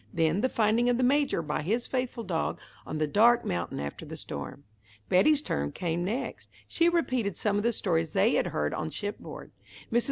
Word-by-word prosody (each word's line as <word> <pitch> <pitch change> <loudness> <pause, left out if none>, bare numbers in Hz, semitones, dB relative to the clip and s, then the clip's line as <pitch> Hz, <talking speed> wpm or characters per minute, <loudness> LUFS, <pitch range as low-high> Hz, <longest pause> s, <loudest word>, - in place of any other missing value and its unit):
Then 165 +3 +1
the 260 - +2
finding 230 +2 +2
of 245 - +2
the 255 - +1
Major 275 - +2
by 150 -1 -2
his 225 +10 0
faithful 250 -2 -2
dog 175 -5 -2 0.3
on 155 - -3
the 155 - +1
dark 230 +9 +4
mountain 85 0 -2
after 70 0 -5
the - - -8
storm. 70 - -7 0.5
Betty's 290 +11 +4
turn 70 0 -2
came 175 0 -2
next. 220 +9 -4 0.2
She 335 +1 +3
repeated 255 - 0
some 205 -1 +1
of - - +1
the 235 - +3
stories 165 -7 0
they - - +3
had - - +2
heard 75 0 -1
on 155 0 -3
shipboard. 205 +5 -6 0.4
Mrs. 235 - +5
205 Hz, 195 wpm, -28 LUFS, 160-245 Hz, 0.5 s, Mrs